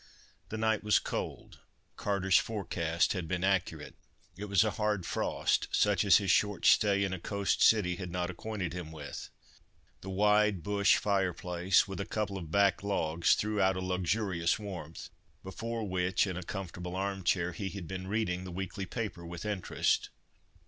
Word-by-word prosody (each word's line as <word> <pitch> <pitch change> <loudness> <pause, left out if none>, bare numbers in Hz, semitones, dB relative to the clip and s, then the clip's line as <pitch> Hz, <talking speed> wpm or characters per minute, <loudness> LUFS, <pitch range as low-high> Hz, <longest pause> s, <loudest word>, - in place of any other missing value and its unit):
The 110 - -4
night 110 -1 +1
was 105 0 +4
cold—Carter's 95 -2 -2
forecast 85 -6 -1
had 90 -4 -4
been 90 +2 -2
accurate. 90 -5 0 0.4
It 100 +4 -6
was 100 -2 +3
a 110 - 0
hard 105 -4 0
frost, - - 0
such 105 -3 +3
as 100 -4 +7
his 100 -3 +1
short 105 +1 +1
stay 100 -1 +5
in 95 -1 -1
a 95 - -4
coast 100 +2 -1
city 90 -6 +4
had 90 -1 -5
not 90 +1 -2
acquainted 95 -2 -4
him 90 -3 -6
with. 75 -2 -8 0.7
The 95 - -9
wide 105 -1 +3
bush 100 -1 +3
fire 95 -3 +1
place, 90 +1 +1
with 95 0 -6
a 100 - -3
couple 105 -3 -2
of 85 -4 -8
back 100 +3 +3
logs, 85 -5 +2
threw 105 -1 -1
out 95 0 +3
a - - -1
luxurious 95 -1 0
warmth, 95 -7 -7 0.3
before 115 +4 -4
which, 95 +1 +1
in 95 -3 -4
a 90 - -4
comfortable 90 -1 -6
arm 95 0 -2
chair, 85 0 +1
he 95 +3 -4
had 95 -4 -7
been 95 +1 -5
reading 95 -3 -1
the 90 - -7
weekly 95 +2 -5
paper 105 -5 -4
with 85 +2 -7
interest. 105 -4 0
95 Hz, 170 wpm, -31 LUFS, 90-105 Hz, 0.7 s, as